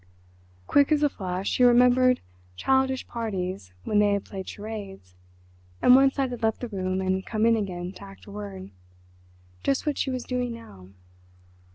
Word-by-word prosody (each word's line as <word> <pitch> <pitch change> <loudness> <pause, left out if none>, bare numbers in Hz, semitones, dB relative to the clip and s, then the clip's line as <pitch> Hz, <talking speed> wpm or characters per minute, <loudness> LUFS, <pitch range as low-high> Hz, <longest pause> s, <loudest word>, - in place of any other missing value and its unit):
Quick 285 +1 +3
as 300 -1 +3
a 295 - +4
flash 185 -5 -4
she - - 0
remembered 250 +1 +5 0.3
childish 265 - +1
parties 190 - -4
when 210 - +1
they 205 -1 +4
had 200 - -2
played 190 -2 -7
charades, 200 - -8 0.7
and 250 - +6
one 270 +1 +7
side 265 -2 -1
had 245 -1 -6
left 220 -1 +1
the 245 - -3
room 185 -2 -2
and 190 0 0
come 215 +1 0
in 230 0 +5
again 180 -4 -3
to 200 - -13
act 195 0 -13
a 205 - -11
word—just 90 - -7
what 295 -2 -1
she - - 0
was 255 -2 -3
doing 250 -1 -2
now. 95 - -13
205 Hz, 170 wpm, -26 LUFS, 185-250 Hz, 0.7 s, one